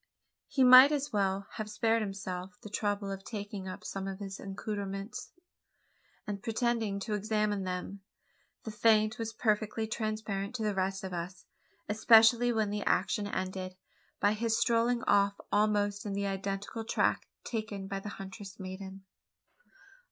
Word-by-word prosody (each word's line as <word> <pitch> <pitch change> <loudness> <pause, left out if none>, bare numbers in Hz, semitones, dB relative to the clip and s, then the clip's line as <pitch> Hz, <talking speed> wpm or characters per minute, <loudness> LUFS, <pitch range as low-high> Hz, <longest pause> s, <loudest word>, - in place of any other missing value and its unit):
He 270 - +2
might 255 +3 +10
as 290 -3 -1
well 195 -1 +1
have 215 -1 -4
spared 225 +1 +1
himself 195 -1 -5
the 210 - -9
trouble 205 -1 -1
of 195 0 -6
taking 205 -2 -6
up 185 - -7
some 195 0 -4
of 195 -1 -4
his 195 -1 -7
accoutrements, 200 +3 -5 0.9
and 200 -1 -4
pretending 225 -3 0
to 215 +1 -3
examine 210 -1 0
them. 185 +2 -4 0.6
The 220 - -5
feint 215 0 +3
was 225 -1 -3
perfectly 220 0 0
transparent 215 -1 -3
to 225 - -2
the 210 -1 +1
rest 195 0 -1
of 190 -1 -5
us 175 +1 -6 0.4
especially 225 +3 +6
when 220 -3 0
the 205 0 -2
action 205 +2 +1
ended, 185 -1 -4 0.4
by 205 +1 +3
his 225 +1 0
strolling 235 0 +2
off 200 0 +3
almost 205 -1 +2
on 200 - -3
the 200 0 -1
identical 195 +3 -3
track 225 - +1 0.2
taken 215 -4 -4
by 195 0 -3
the 205 - -7
huntress 195 0 -9
maiden! 190 0 -7
205 Hz, 150 wpm, -31 LUFS, 195-220 Hz, 0.9 s, might